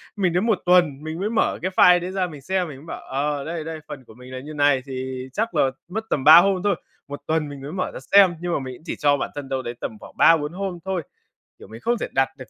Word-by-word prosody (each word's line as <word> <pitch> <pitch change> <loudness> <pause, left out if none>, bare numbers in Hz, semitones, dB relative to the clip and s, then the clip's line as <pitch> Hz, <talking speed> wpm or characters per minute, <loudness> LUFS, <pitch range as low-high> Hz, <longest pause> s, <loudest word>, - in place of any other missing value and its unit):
mình 185 -4 0
đến 180 +5 +1
1 220 -5 +2
tuần, 170 -6 +3
mình 160 +1 -5
mới 205 +3 -1
mở 230 - 0
cái 185 +1 -2
file 180 0 +7
đấy 180 +2 -5
ra 190 -2 -1
mình 150 -4 -10
xem, 180 +4 -1
mình 140 -4 -9
mới 145 - -14
bảo: - - -7
"Ờ, 140 +1 -2
đây, 165 0 -4
đây, 160 0 -6
phần 135 -2 -8
của - - -15
mình 125 +2 -13
là 130 - -5
như 150 +3 -9
này, 145 -3 +3
thì 130 -1 -5
chắc 225 +2 -2
là 135 - +3 0.2
mất 220 +4 -3
tầm 135 - -1
3 155 +2 +10
hôm 190 0 +4
thôi." 205 -2 +2 0.3
1 145 0 -7
tuần 160 -2 0
mình 140 -1 -9
mới 145 +3 -7
mở 185 0 -3
ra - - -7
xem, 195 -3 +6
nhưng 175 -1 -2
mà - - 0
mình 130 -1 -6
cũng 155 - -18
chỉ - - -4
cho 145 -1 +2
bản - - -3
thân 140 -2 -6
đâu 130 -1 -1
đấy 120 -1 -5
tầm 110 - -5
khoảng - - -14
3-4 160 -1 +4
hôm 190 -2 -4
thôi. 190 -3 -1 0.6
Kiểu - - -13
mình 110 +2 -11
không 240 0 +1
thể - - -3
đặt 135 0 +2
được 130 - -11
155 Hz, 295 wpm, -23 LUFS, 135-180 Hz, 0.6 s, 3